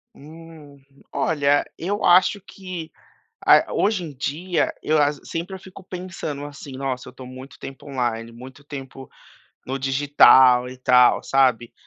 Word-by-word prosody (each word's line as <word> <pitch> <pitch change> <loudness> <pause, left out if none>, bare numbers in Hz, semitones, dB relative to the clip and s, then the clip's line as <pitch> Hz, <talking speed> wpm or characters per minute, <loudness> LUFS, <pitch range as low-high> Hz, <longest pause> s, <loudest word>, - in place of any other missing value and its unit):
Hum. 155 -2 -14 0.3
Olha, 145 -3 +1
eu 200 +5 -3
acho 185 +3 +4
que 185 -4 -9 0.6
a - - +5
hoje 205 -3 0
em 155 -3 -8
dia, 160 +7 -2
eu 155 - +1
as 145 0 0
sempre 170 +4 -5
eu - - -10
fico 190 0 -13
pensando, 180 -6 -6
assim: 145 -1 -10
"Nossa, 130 -1 -4
eu - - -10
estou 130 - -12
muito 130 +2 -11
tempo 135 +2 -10
online, 120 -3 -3
muito 130 +4 -13
tempo 135 -2 -10 0.6
no 135 +1 -4
digital." 135 -2 +5
E 130 - -10
tal, 125 -1 +4
sabe. 125 -3 +1
145 Hz, 145 wpm, -22 LUFS, 130-165 Hz, 0.6 s, a